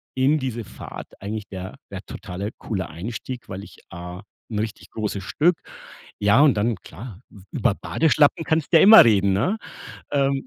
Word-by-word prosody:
in 135 Hz, +4 st, +3 dB
diese 120 Hz, -3 st, -3 dB
Fahrt -, -, -9 dB
eigentlich 105 Hz, +1 st, -5 dB
der 95 Hz, -1 st, -7 dB, 0.2 s
der -, -, -6 dB
totale, 100 Hz, +4 st, -6 dB
coole 95 Hz, -5 st, -3 dB
Einstieg, 115 Hz, +8 st, -7 dB
weil 95 Hz, +1 st, -6 dB
ich -, -, -14 dB
A 90 Hz, +2 st, -8 dB, 0.3 s
'n 105 Hz, -, -2 dB
richtig 110 Hz, 0 st, -5 dB
großes 105 Hz, -3 st, -3 dB
Stück. 165 Hz, -, +2 dB, 0.6 s
Ja 100 Hz, +7 st, +4 dB
und 150 Hz, -3 st, +6 dB
dann 110 Hz, +3 st, +1 dB
klar, 100 Hz, +5 st, -11 dB, 0.3 s
über -, -, +1 dB
Badeschlappen 160 Hz, +1 st, +2 dB
kannst 160 Hz, -2 st, 0 dB
du -, -, +9 dB
ja -, -, +6 dB
immer 220 Hz, +2 st, +10 dB
reden, 100 Hz, -3 st, +3 dB
ne? 150 Hz, -, +1 dB, 0.6 s
Ähm. 135 Hz, -1 st, +1 dB
110 Hz, 165 wpm, -23 LUFS, 95-140 Hz, 0.6 s, immer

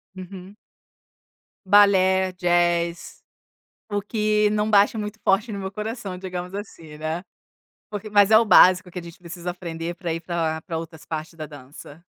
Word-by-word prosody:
Uhum. 185 Hz, +1 st, -10 dB, 1.1 s
Balé, 190 Hz, -2 st, +4 dB
jazz, 175 Hz, -1 st, 0 dB, 0.7 s
o 205 Hz, -1 st, -2 dB
que 210 Hz, 0 st, +1 dB
não 210 Hz, 0 st, 0 dB
bata 205 Hz, +1 st, +4 dB
muito 210 Hz, 0 st, -6 dB
forte 215 Hz, +4 st, +1 dB
no 200 Hz, -, -4 dB
meu 190 Hz, 0 st, -5 dB
coração 210 Hz, -2 st, -5 dB
digamos, 180 Hz, -1 st, -6 dB
assim, 165 Hz, -7 st, -9 dB
né, 155 Hz, +3 st, -3 dB, 0.7 s
porque 210 Hz, 0 st, -6 dB
mas 205 Hz, -1 st, +4 dB
é 220 Hz, -, +8 dB
o 230 Hz, -, +3 dB
básico 185 Hz, -3 st, +6 dB
que 180 Hz, +1 st, -7 dB
a -, -, -12 dB
gente 170 Hz, 0 st, -12 dB
precisa 175 Hz, 0 st, -7 dB
aprender 170 Hz, -1 st, -6 dB
para 170 Hz, -2 st, -3 dB
ir 165 Hz, -, -4 dB
para 165 Hz, -2 st, -2 dB
para 165 Hz, -3 st, -4 dB
outras 160 Hz, -1 st, -9 dB
partes 160 Hz, +1 st, -6 dB
da 155 Hz, -2 st, -7 dB
dança. 145 Hz, +2 st, -13 dB
185 Hz, 165 wpm, -23 LUFS, 170-205 Hz, 1.1 s, é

